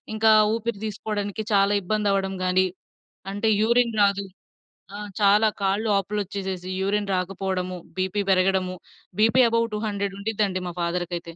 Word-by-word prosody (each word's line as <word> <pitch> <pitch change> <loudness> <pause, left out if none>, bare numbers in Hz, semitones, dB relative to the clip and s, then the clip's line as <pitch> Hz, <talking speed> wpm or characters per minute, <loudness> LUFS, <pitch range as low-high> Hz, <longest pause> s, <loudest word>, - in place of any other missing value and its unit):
ఇంకా 220 0 +4 0.2
ఊపిరి 230 -2 -3
తీసుకోడానికి 210 -1 -3
చాలా 200 +1 +4
ఇబ్బందవ్వడం 195 -1 0
గాని, 185 +1 +3 0.7
అంటే 210 +2 0
యూరిన్ 235 0 +2
రాదు. 200 0 +2 0.7
ఆ! - - -5 0.3
చాలా 210 +2 +5
కాళ్ళు 195 +3 +1
వాపులొచ్చేసేసి, 195 -2 -3
యూరిన్ 205 +1 0
రాకపోవడము, 185 0 -3 0.2
బీపీ 190 +2 0
పెరగడము, 185 0 +1 0.4
బీపీ 225 +4 +5
అబోవ్ 230 0 +1
200 200 -2 -3
ఉండిద్దండి 200 -3 -1
మా 175 - -7
ఫాదర్‌కైతే. 175 0 -2
200 Hz, 120 wpm, -24 LUFS, 185-215 Hz, 0.7 s, చాలా